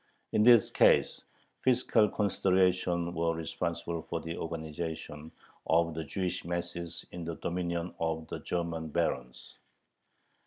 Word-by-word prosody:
In - - +3
this 120 -1 +7
case - - +4 0.4
fiscal 120 -4 +3
considerations 90 -3 +1
were 85 0 0
responsible 85 +1 -3
for 85 - -4
the 80 +1 -5
organization 80 -1 -5 0.4
of 85 +1 +3
the 80 +1 -4
Jewish 90 +4 -3
masses 85 0 -4
in 90 - -6
the 80 0 -4
dominion 85 0 -3
of 80 -1 -2
the - - -5
German 85 -2 -3
barons. 65 -6 -3
85 Hz, 120 wpm, -31 LUFS, 80-90 Hz, 0.4 s, this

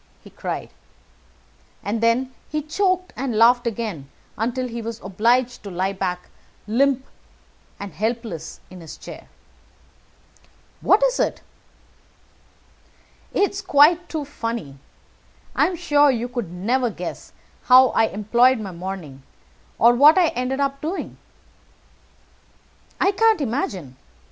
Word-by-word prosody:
he - - -14
cried, - - -5 1.1
and 215 +2 -2
then 245 +3 +1 0.2
he 305 - -1
choked, 370 +3 0
and 255 -3 -3
laughed 240 +2 +5
again 210 - -4 0.3
until 245 +3 -2
he 235 -1 -6
was 230 0 -6
obliged 235 +6 +1
to 200 - -8
lie 190 +2 -1
back, 180 -2 -4 0.4
limp 265 +4 +1 0.7
and 200 -3 -7
helpless, 220 -2 -4
in 185 - -10
the 165 - -12
chair. - - -10 1.5
"What 420 +4 +4
is - - +2
it?" - - -1 1.9
"It's 400 0 0
quite 340 0 +4
too 310 -3 -3
funny. 230 - -5 0.8
I - - +4
am 365 - -3
sure 290 -3 +3
you 245 -2 0
could 240 -7 -4
never 235 +8 0
guess 180 -4 -7 0.3
how 255 0 +7
I - - +3
employed 235 +5 +2
my 200 -3 -6
morning, 175 -6 -7 0.6
or 235 +1 +6
what 290 +7 +7
I 350 -3 +4
ended 255 +2 -2
by 280 -1 +1
doing." 330 +5 -4 1.8
"I 390 - +3
can't 440 0 +3
imagine. 200 - -3
240 Hz, 125 wpm, -22 LUFS, 200-280 Hz, 1.9 s, how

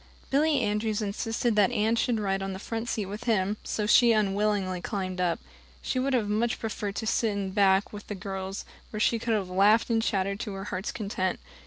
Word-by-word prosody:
Billy 290 0 +3
Andrews 210 0 0
insisted 225 +2 -1
that 205 -2 +5
Anne 220 +2 +2
should 235 -1 +1
ride 195 -2 0
on 195 0 -3
the - - -5
front 225 +4 -4
seat 215 -3 -1
with 210 +5 -7
him, 210 -3 +1
so 210 - -2
she 235 +2 +6
unwillingly 200 -3 +1
climbed 185 -2 -3
up. 175 -2 +1 0.4
She 255 - -2
would 270 +1 0
have 230 -5 +2
much 225 +3 0
preferred 210 -2 -4
to 225 - -3
sit 200 -4 0
back 195 0 +3
with 205 0 -8
the 205 - -4
girls, 195 0 -5 0.2
where 215 - -5
she 230 +1 +2
could 230 0 0
have 200 -3 -1
laughed 205 +6 +4
and 225 -1 +3
chattered 200 -2 0
to 205 - -4
her 195 0 -5
heart's 190 0 -3
content. 195 -3 -2
210 Hz, 205 wpm, -28 LUFS, 195-225 Hz, 0.4 s, she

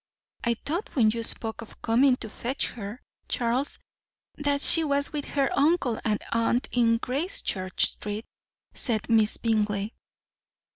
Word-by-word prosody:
"I 235 -1 +1
thought, 345 - -4
when 225 -5 +4
you 230 +1 -3
spoke 225 0 -1
of 225 - -13
coming 250 +3 +4
to 220 - -6
fetch 255 +5 -2
her, 215 +1 -8 0.2
Charles, 245 +4 -1 0.6
that 285 -1 0
she 330 - +6
was 285 0 +4
with 290 -2 -3
her 275 -2 0
uncle 285 -6 +2
and 215 -2 0
aunt 230 +2 +1
in 230 -2 +3
Gracechurch 250 - -1
Street," 210 +2 -6 0.5
said 230 -2 -1
Miss 220 -2 +4
Bingley. 210 -2 0
235 Hz, 140 wpm, -26 LUFS, 220-280 Hz, 0.6 s, she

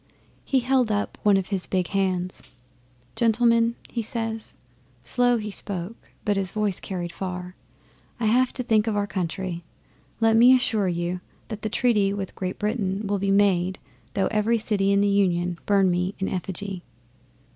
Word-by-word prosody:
'He 265 -2 +1
held 250 -2 +2
up 205 0 -2
one 205 -2 +4
of 190 -1 -2
his 195 -3 -2
big 185 -2 -1
hands. 185 -2 -1 0.7
"Gentlemen," 230 0 +3
he 235 - -3
says 225 0 -4 0.5
slow 245 -1 +2
he 210 -1 -4
spoke, 195 +1 -6 0.2
but 205 -2 +1
his 195 -2 0
voice 210 -1 -1
carried 175 -3 -5
far 180 0 -5 0.7
"I 230 - -1
have 245 +4 +3
to 255 - -2
think 220 -2 +2
of 220 - 0
our 205 0 +1
country. 180 -1 -3 0.6
Let 225 -1 +4
me 245 +3 +8
assure 220 -5 +1
you 175 +1 -2 0.3
that 215 -2 -6
the 215 - -2
treaty 210 -4 +2
with 195 -2 -5
Great 185 -1 -4
Britain 210 -2 -1
will 200 0 0
be 195 +1 -1
made 190 -2 +3 0.4
though 195 - +2
every 220 +2 +2
city 205 -3 +1
in 200 0 +4
the 205 - +3
Union 180 -3 +1
burn 195 -2 +4
me 180 +3 -1
in 190 - -2
effigy." 190 0 -4
200 Hz, 165 wpm, -25 LUFS, 185-225 Hz, 0.7 s, me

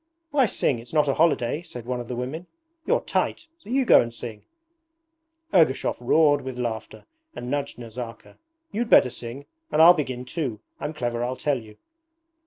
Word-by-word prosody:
'Why 275 -4 +4
sing? 135 - 0
It's 120 +4 -12
not 150 -2 +3
a 135 - +2
holiday,' 150 -3 +2
said 120 -8 -10
one 125 0 -2
of 120 - -6
the 125 - -4
women. 140 +8 -5 0.4
'You're - - +3
tight, - - -1
so 320 - -15
you 265 +1 +2
go - - +7
and 120 -1 -4
sing.' 115 -2 -8 1.1
Ergushov 160 -8 +3
roared 145 +3 +4
with 130 -1 -6
laughter 115 -3 -4 0.3
and 125 +1 -5
nudged 140 -1 -2
Nazarka. 115 0 -9 0.3
'You'd 230 +3 -2
better 125 - +6
sing. 120 +3 -8 0.3
And 150 - +1
I'll 170 +2 +10
begin 130 -6 -3
too. 125 -7 -3 0.2
I'm 155 - -4
clever, 120 -4 -2
I 125 +1 -2
tell 140 0 0
you.' 110 -2 -14
130 Hz, 180 wpm, -25 LUFS, 120-155 Hz, 1.1 s, I'll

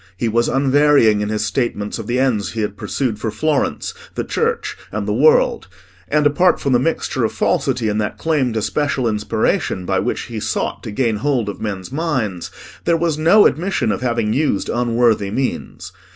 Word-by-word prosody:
He 115 - -1
was 115 +2 +1
unvarying 135 -5 +4
in 105 - -2
his 110 0 -1
statement 105 -1 -2
of 110 - -6
the 120 - 0
ends 115 -8 0
he 115 - -2
had 105 -1 -2
pursued 115 -1 -2
for 110 - -2
Florence, 145 - -1 0.2
the - - -1
Church, 465 0 -1 0.2
and - - -3
the - - 0
world; - - +3 0.4
and, 150 -1 +1
apart 175 +5 +3
from 140 - 0
the 120 - +4
mixture 165 +6 -1
of - - 0
falsity 115 -3 0
in 105 0 0
that 105 -1 -2
claim 150 -6 0
to 110 -2 -1
special 140 -3 0
inspiration 105 -3 -1
by 95 +1 +1
which 95 - -2
he 115 -2 -6
sought - - -2
to - - -7
gain 115 0 0
hold 120 -3 0
of 100 - -7
men's 95 -3 -4
minds, 130 - -2 0.4
there 170 -1 +3
was 165 -2 -1
no 190 +7 +6
admission 165 - +1
of - - -3
having 115 -3 0
used 140 -6 0
unworthy 120 -4 +1
means. 130 +5 -4
120 Hz, 190 wpm, -19 LUFS, 105-145 Hz, 0.4 s, no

